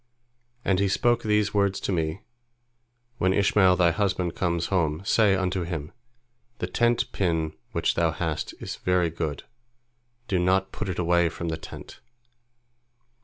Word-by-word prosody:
And 95 -2 +2
he 100 - +2
spoke 120 +5 +2
these 105 -1 +1
words 100 -2 +1
to - - -2
me, 80 +1 -1 1.0
When 95 +1 +2
Ishmael 100 -2 +4
thy 85 -2 +4
husband 90 -1 -1
comes 85 -2 -1
home, 80 -1 0
say 105 -2 +4
unto 95 0 -1
him, 80 -4 -4 0.7
The - - -2
tent 120 +6 +1
pin 80 -4 0 0.2
which - - +1
thou 85 -1 +2
hast 80 -1 -3
is - - -6
very 90 -2 +1
good, 80 -3 -4 0.8
do 95 -5 +1
not 95 +2 +2
put - - -4
it 90 - -3
away 85 -1 +2
from 85 +1 -5
the 80 - -1
tent." - - -11
90 Hz, 150 wpm, -26 LUFS, 85-100 Hz, 1.0 s, Ishmael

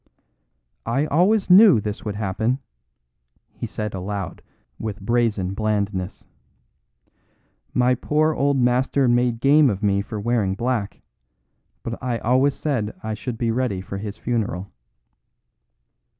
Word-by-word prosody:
"I 135 +6 +1
always 185 +6 +2
knew 195 - +8
this 105 0 -5
would 105 -2 -4
happen," 110 +4 -1 1.0
he - - -5
said 105 -1 -5
aloud 95 +1 -5 0.4
with 105 -2 -5
brazen 105 -3 0
blandness. 100 -3 -2 1.5
"My 125 0 +4
poor 155 +5 +1
old 140 -1 +1
master 130 +2 +2
made 120 -1 +2
game 140 +2 +5
of 100 -1 -3
me 100 -1 +2
for 110 +1 -6
wearing 105 -3 0
black; 115 -2 -2 0.8
but 115 0 -5
I 125 -2 -1
always 130 +5 +2
said 120 -9 -2
I 110 0 -3
should 115 +2 -5
be 115 -1 0
ready 115 -5 -1
for 100 +1 -6
his 105 0 -6
funeral." 100 -6 -3
115 Hz, 125 wpm, -22 LUFS, 105-130 Hz, 1.5 s, knew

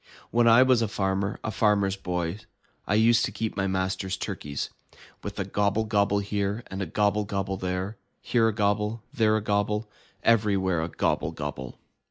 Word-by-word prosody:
When 120 0 +4
I 115 +2 +8
was 130 -3 +4
a 115 - +1
farmer, 95 -1 -1
a 110 - -2
Farmer's 100 -3 +2
Boy, 90 -1 -3 0.5
I 105 - +2
used 115 +1 +5
to - - -4
keep 110 +2 -3
my 95 -1 0
master's 95 0 -1
turkeys. 70 -5 -4 0.5
With - - -6
a - - -1
gobble 105 +2 +1
gobble 100 -2 +2
here, 100 +2 -1
and 95 +1 -4
a 95 - -2
gobble 105 +4 +1
gobble 100 -1 -2
there, 95 +3 -3 0.2
Here 115 -2 +2
a - - +2
gobble, 105 +1 0
there 110 -5 +3
a - - -2
gobble. 105 +1 0 0.4
Everywhere 100 -6 +2
a 80 - -3
gobble 80 -1 0
gobble! 70 -5 -6
100 Hz, 175 wpm, -27 LUFS, 95-110 Hz, 0.5 s, I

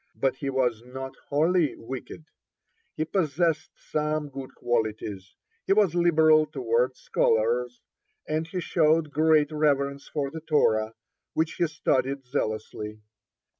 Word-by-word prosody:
But 135 -1 0
he 140 - -3
was 125 -4 0
not 130 +2 -7
wholly 160 +2 +2
wicked, 130 +6 -8 0.7
he 155 - 0
possessed 165 -2 0 0.2
some 150 -1 -1
good 135 -1 -8
qualities. 105 -5 -2 0.3
He - - +5
was 200 -5 +3
liberal 160 -3 +5
toward 125 +1 0
scholars, 120 +2 +1 0.5
and 155 +1 -1
he 180 +2 -4
showed 160 -2 +2
great 155 -1 +3
reverence 140 -2 0
for 140 -3 -3
the 160 - -7
Torah, 110 -8 +2 0.4
which 160 +1 +1
he 170 - +1
studied 135 -3 0
zealously. 110 -4 -3
140 Hz, 125 wpm, -26 LUFS, 125-155 Hz, 0.7 s, He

